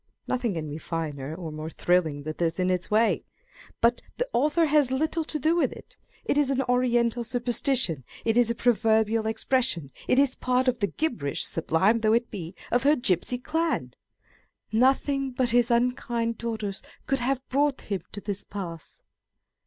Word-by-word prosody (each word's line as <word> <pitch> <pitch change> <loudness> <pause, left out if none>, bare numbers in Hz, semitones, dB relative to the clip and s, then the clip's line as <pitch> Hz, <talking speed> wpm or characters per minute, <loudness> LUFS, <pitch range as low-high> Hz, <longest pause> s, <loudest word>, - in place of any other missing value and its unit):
Nothing 240 -6 -1
can 155 -2 -3
be 150 +2 -6
finer 155 -3 -4
or 170 -3 -6
more 155 +1 -6
thrilling 160 -3 +1
than 155 +1 -4
this 165 -1 0
in 185 0 +2
its 180 -1 -1
way; 220 +2 +2 0.6
but 235 +1 +3 0.2
the - - -1
author 300 +6 +3
has 295 -3 +3
little 315 +5 0
to 310 - -1
do 315 +4 +2
with 345 - +2
it. - - -12 0.3
It 290 - +2
is 285 -2 +2
an 270 -1 +1
Oriental 240 -1 +1
superstition; 240 - +1 0.2
it 225 -1 +2
is 240 -1 +4
a 235 - 0
proverbial 220 -2 +2
expression; 225 - 0 0.2
it - - +3
is 275 -2 +4
part 255 0 0
of 245 -1 +1
the 200 - +1
gibberish 195 - -2
(sublime 185 +7 +2
though 215 -1 +2
it 235 +1 +1
be) 175 -1 -7 0.2
of 245 - +3
her 290 +2 +4
gipsy 240 - 0
clan! 320 +6 -1
â€" - - -32 0.5
" - - -43
Nothing 270 +1 +2
but 250 -1 0
his 240 0 +3
unkind 235 -1 0
daughters 220 -4 -3 0.2
could 270 0 0
have 260 +2 -1
brought 280 +1 +1
him 200 -3 -3
to 205 - -6
this 205 -1 -3
pass." 170 -5 -8
235 Hz, 180 wpm, -26 LUFS, 185-260 Hz, 0.6 s, is